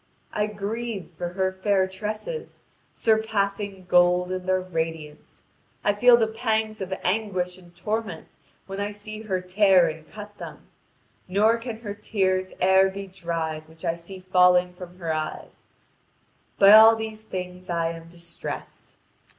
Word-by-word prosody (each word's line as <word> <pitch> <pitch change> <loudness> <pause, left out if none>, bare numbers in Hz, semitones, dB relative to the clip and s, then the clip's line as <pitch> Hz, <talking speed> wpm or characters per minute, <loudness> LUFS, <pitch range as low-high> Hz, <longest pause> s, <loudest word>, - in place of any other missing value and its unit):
I 210 0 0
grieve 210 -1 -5
for 175 +1 -5
her 190 0 0
fair 190 0 +1
tresses, 215 - -6 0.3
surpassing 200 -3 0
gold 180 0 +4
in 185 0 -4
their 185 0 +3
radiance; 160 -4 -5 0.4
I 205 - +3
feel 240 +3 +6
the 225 - +3
pangs 220 -1 -1
of 190 0 -5
anguish 185 -2 -1
and 175 -1 -19
torment 210 -1 -4 0.3
when 195 0 -6
I 205 0 -1
see 215 +1 -8
her 190 -4 -2
tear 185 -1 +4
and 155 -1 -10
cut 210 +2 -10
them, - - -10 0.6
nor 215 +5 +3
can 230 -1 -7
her 205 -3 -5
tears 190 -3 -1
e'er 190 +1 +5
be 195 +1 -6
dried 165 -4 -4
which 160 +2 -11
I 165 - +1
see 170 +3 -10
falling 180 -1 +4
from 180 0 -11
her 165 -3 -2
eyes; 155 0 -6 0.9
by 195 0 +8
all 220 +1 +9
these 220 -1 -6
things 180 -3 -7
I 165 -1 0
am 165 0 -10
distressed. 170 0 -8
190 Hz, 150 wpm, -25 LUFS, 180-210 Hz, 0.9 s, all